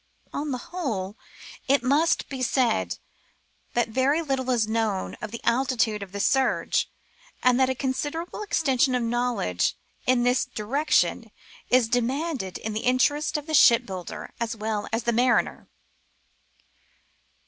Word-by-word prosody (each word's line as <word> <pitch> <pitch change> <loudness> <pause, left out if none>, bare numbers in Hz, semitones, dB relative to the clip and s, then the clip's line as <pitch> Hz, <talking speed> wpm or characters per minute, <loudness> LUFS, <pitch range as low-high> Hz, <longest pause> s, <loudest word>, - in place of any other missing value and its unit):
On 295 +1 -3
the 255 - -1 0.2
whole, 215 - -3 0.5
it 275 -1 +3
must 290 +6 +2
be 265 -2 -6
said 235 - +1 0.8
that 240 -1 +2
very 270 +7 +1
little 265 -3 -2
is 235 -4 +2
known 220 -3 -1
of 215 - -4
the 235 +2 -8
altitude 235 -4 +1
of 195 -2 -8
the 200 - -5
surge, 265 +5 +1 0.5
and 250 0 +4
that 260 0 +4
a 260 - 0
considerable 290 - -3
extension 270 -10 +1
of 245 - 0
knowledge 230 - 0 0.3
in 250 -1 +3
this 250 +1 +3
direction 270 +8 0 0.4
is 250 -2 +4
demanded 245 - -1
in 220 - -5
the 215 - -1
interest 255 +6 +1
of 295 - -6
the 315 - -5
ship* 240 -5 +6
builder 190 +2 -7
as 230 -1 -2
well 215 -1 -3
as 225 +1 -1
the 235 - +1
mariner. 245 +2 +1
245 Hz, 145 wpm, -25 LUFS, 220-270 Hz, 0.8 s, ship